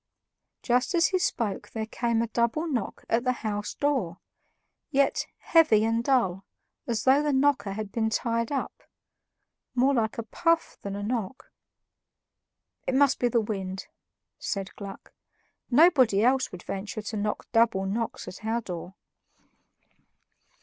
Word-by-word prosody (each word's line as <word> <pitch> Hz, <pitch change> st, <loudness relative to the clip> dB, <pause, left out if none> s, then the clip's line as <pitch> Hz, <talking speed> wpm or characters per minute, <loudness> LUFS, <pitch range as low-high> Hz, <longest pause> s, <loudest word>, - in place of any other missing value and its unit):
Just 250 Hz, +8 st, +1 dB
as 335 Hz, -1 st, +4 dB
he 370 Hz, -, +1 dB
spoke 230 Hz, -, -1 dB
there 220 Hz, -1 st, -4 dB
came 230 Hz, 0 st, 0 dB
a -, -, -2 dB
double 235 Hz, +8 st, 0 dB
knock 255 Hz, -9 st, -3 dB
at 230 Hz, +1 st, +1 dB
the 255 Hz, 0 st, +2 dB
house 210 Hz, -1 st, -2 dB
door, 255 Hz, -13 st, 0 dB, 0.7 s
yet 280 Hz, -1 st, +1 dB
heavy 305 Hz, -11 st, +4 dB
and 230 Hz, +1 st, +1 dB
dull, 195 Hz, -9 st, +1 dB, 0.4 s
as 225 Hz, -3 st, -1 dB
though 270 Hz, +2 st, +5 dB
the 300 Hz, 0 st, +1 dB
knocker 265 Hz, -7 st, +2 dB
had 210 Hz, -1 st, -5 dB
been 220 Hz, -1 st, 0 dB
tied 230 Hz, +2 st, -1 dB
up 275 Hz, -, -3 dB, 0.9 s
more 260 Hz, +3 st, +4 dB
like 220 Hz, -4 st, 0 dB
a 230 Hz, -, -2 dB
puff 330 Hz, +7 st, 0 dB
than 200 Hz, 0 st, -5 dB
a 205 Hz, -, -4 dB
knock. 235 Hz, +2 st, -4 dB, 1.4 s
"It 260 Hz, -, +1 dB
must 280 Hz, 0 st, +4 dB
be 245 Hz, -, +3 dB
the 235 Hz, -1 st, +2 dB
wind," 195 Hz, -3 st, -4 dB, 0.5 s
said 195 Hz, -1 st, -4 dB
Gluck; 200 Hz, -1 st, -9 dB, 0.6 s
"nobody 255 Hz, -, +5 dB
else 260 Hz, +2 st, +2 dB
would 180 Hz, -, -9 dB
venture 210 Hz, +2 st, -5 dB
to 215 Hz, +1 st, -4 dB
knock 210 Hz, +1 st, -2 dB
double 225 Hz, -5 st, +3 dB
knocks 220 Hz, +4 st, -3 dB
at 185 Hz, -, -9 dB
our 225 Hz, +2 st, 0 dB
door." 180 Hz, -2 st, -7 dB
230 Hz, 145 wpm, -27 LUFS, 210-265 Hz, 1.4 s, though